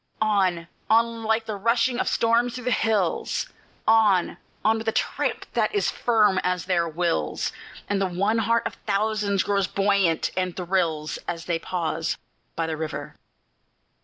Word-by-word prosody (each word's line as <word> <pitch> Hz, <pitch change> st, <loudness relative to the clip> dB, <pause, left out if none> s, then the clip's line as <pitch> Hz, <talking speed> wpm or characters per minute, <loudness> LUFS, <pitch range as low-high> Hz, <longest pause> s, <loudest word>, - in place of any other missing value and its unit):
_" -, -, -49 dB, 0.2 s
On! 190 Hz, -6 st, +1 dB, 0.2 s
on! 230 Hz, +1 st, +2 dB
like 220 Hz, +1 st, +1 dB
the 215 Hz, -, -4 dB
rushing 235 Hz, +4 st, +1 dB
of -, -, 0 dB
storms 235 Hz, +1 st, +2 dB
through 250 Hz, -, -6 dB
the 250 Hz, -, 0 dB
hills, 215 Hz, -7 st, 0 dB, 0.4 s
On! 215 Hz, -5 st, +4 dB, 0.3 s
on! 220 Hz, +1 st, +3 dB
with 225 Hz, -, -7 dB
a -, -, +3 dB
tramp -, -, -1 dB
that -, -, +1 dB
is 405 Hz, -, +1 dB
firm 210 Hz, -5 st, +3 dB
as 180 Hz, -1 st, -1 dB
their 170 Hz, -3 st, +1 dB
wills, 170 Hz, +1 st, -1 dB, 0.4 s
And 200 Hz, -1 st, 0 dB
the 195 Hz, -, +2 dB
one 200 Hz, +5 st, +1 dB
heart 230 Hz, +1 st, +1 dB
of -, -, -2 dB
thousands 205 Hz, -1 st, +1 dB
grows 200 Hz, -2 st, +1 dB
buoyant, 195 Hz, -4 st, +1 dB
and 185 Hz, -1 st, -2 dB
thrills, 170 Hz, -4 st, -1 dB
As 170 Hz, -1 st, -4 dB
they 170 Hz, -2 st, -1 dB
pause 165 Hz, -2 st, -2 dB, 0.4 s
by 165 Hz, -, -1 dB
the 160 Hz, -1 st, -3 dB
river. 155 Hz, -1 st, -5 dB
200 Hz, 160 wpm, -25 LUFS, 175-225 Hz, 0.4 s, On